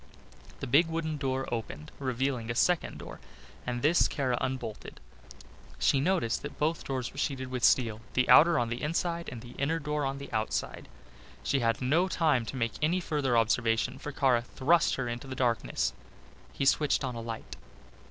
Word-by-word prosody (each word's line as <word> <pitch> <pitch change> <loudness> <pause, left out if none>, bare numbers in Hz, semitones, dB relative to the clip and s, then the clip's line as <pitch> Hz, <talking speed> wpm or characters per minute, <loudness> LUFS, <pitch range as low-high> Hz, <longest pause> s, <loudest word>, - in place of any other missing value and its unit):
The - - -2
big 145 +7 +4
wooden 160 -1 -2
door 135 -1 -2
opened, 105 -10 -5
revealing 130 -2 -1
a 115 - -2
second 175 +6 +1
door - - -9 0.5
and 120 -1 -2
this 160 +4 +4
Kara 130 -3 -1
unbolted. 125 -5 -4 0.8
She 135 - +3
noticed 155 -7 +1
that 145 - -7
both 155 +2 0
doors 130 -3 -3
were 140 - -8
sheeted 130 -3 -2
with 125 -2 -4
steel, 115 -4 +3
the 125 - +3
outer 160 +6 +7
on 120 -3 0
the 120 +1 -4
inside, 170 +2 -1
and 120 - -7
the 120 - -10
inner 150 +4 +1
door 150 -1 -2
on 135 0 -2
the 140 - -9
outside. 110 0 -2 0.6
She 140 - +1
had 115 +1 0
no 160 +9 +3
time 155 -10 +1
to - - -5
make 115 -3 -1
any 165 +4 +2
further 145 -8 0
observations 115 +3 +1
for 145 - -5
Kara 130 -4 +2
thrust 150 +7 +2
her 135 -2 -3
into 120 +3 -5
the 130 - -5
darkness. 120 -3 0 0.6
He 135 - -2
switched 145 +1 +3
on 130 -2 -2
a 115 - -5
light. 115 -1 -6
130 Hz, 180 wpm, -29 LUFS, 120-150 Hz, 0.8 s, outer